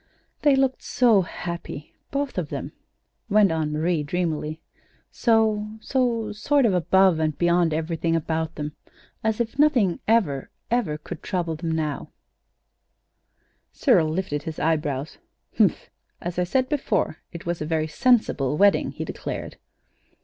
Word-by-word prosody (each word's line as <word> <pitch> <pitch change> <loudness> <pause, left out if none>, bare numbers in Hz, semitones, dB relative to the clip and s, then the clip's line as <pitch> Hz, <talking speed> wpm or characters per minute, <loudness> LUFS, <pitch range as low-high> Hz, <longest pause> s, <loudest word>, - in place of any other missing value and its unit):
"They 290 -2 +5
looked 270 -1 +1
so 230 -6 +4
happy 170 -4 -6 0.2
both 280 -7 -2
of 160 -5 -4
them," - - -5 0.6
went 205 -2 +5
on 160 -2 -1
Marie, 160 +1 0
dreamily; 155 0 -2 0.5
"so 220 -2 +1
so 235 -3 0
sort 265 +6 +2
of 210 - +3
above 185 0 +4
and 155 -2 0
beyond 175 -1 +3
everything 165 +1 -1
about 160 0 -2
them, 150 0 -4 0.5
as 220 0 0
if 235 +3 -2
nothing 250 - +3
ever, 185 -12 +2 0.2
ever 235 -11 +1
could 150 - -8
trouble 170 -4 -2
them 165 +1 -3
now." 155 -3 -2 1.6
Cyril 160 -1 +3
lifted 155 -3 -2
his 160 +1 -6
eyebrows. 150 -3 -1 0.4
"Humph! - - +5
Well, - - -25 0.4
as 175 - -4
I 180 - +2
said 255 +8 +1
before, 230 - 0
it 170 - -9
was 170 -1 -2
a - - -1
very 160 -1 0
sensible 155 - +2
wedding," 200 +2 +3
he - - -5
declared. - - -6
175 Hz, 140 wpm, -24 LUFS, 155-220 Hz, 1.6 s, They